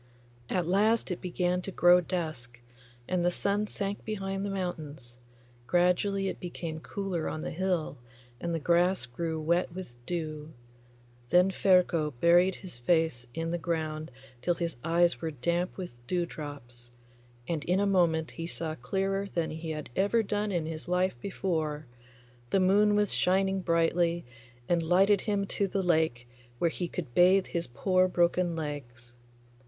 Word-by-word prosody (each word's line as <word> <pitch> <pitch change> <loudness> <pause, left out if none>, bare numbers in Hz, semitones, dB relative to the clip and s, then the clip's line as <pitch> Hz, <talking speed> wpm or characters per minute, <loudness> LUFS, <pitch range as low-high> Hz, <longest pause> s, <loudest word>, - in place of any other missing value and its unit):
At 180 -2 0
last 210 +4 +2
it 180 - -4
began 180 0 0
to 195 - -6
grow 175 0 +6
dusk, 155 -9 -4 0.5
and 180 -1 0
the 175 - +4
sun 200 +3 0
sank 200 0 -3
behind 195 -2 -3
the 200 - -2
mountains; 155 -10 -5 0.5
gradually 180 +3 +2
it - - -4
became 170 -2 -5
cooler 185 -1 -3
on 155 - -4
the - - -4
hill, 175 -5 -1 0.4
and 170 - -3
the 165 - 0
grass 175 +1 +2
grew 160 +6 -3
wet 170 +3 +1
with 185 -10 -7
dew. 155 -3 -4 0.8
Then 180 +2 +5
Ferko 175 -6 +3
buried 175 +4 +5
his 180 -11 -10
face 160 -3 +1
in 165 0 -2
the 175 - -1
ground 155 -2 -2 0.3
till 175 - +1
his 170 -1 -3
eyes 170 +1 +2
were 165 - -1
damp 170 +5 -1
with 185 -2 -5 0.2
dewdrops, 145 -8 -5 0.6
and 160 -3 -2
in 180 +2 +2
a 205 - +2
moment 170 -5 +2
he 165 0 -5
saw 165 -2 -3
clearer 195 +9 -1
than 170 -2 -1
he 160 +1 -6
had 155 -5 -5
ever 205 +4 +2
done 210 0 -1
in 170 -4 -1
his 160 0 -6
life 180 -3 +1
before. 160 -6 -2 0.6
The 195 - +3
moon 205 +3 +4
was 205 -1 +2
shining 190 +1 +2
brightly, 170 0 +1 0.4
and 170 -1 +2
lighted 190 +4 +4
him 205 -2 0
to 200 0 -1
the 195 0 -1
lake 160 -9 +1 0.3
where 170 +5 +1
he 175 - -3
could 155 -7 -6
bathe 185 +4 +5
his 170 -1 -3
poor 185 +9 +2
broken 175 -1 +1
legs. 120 -6 -6
175 Hz, 160 wpm, -29 LUFS, 160-190 Hz, 0.8 s, grow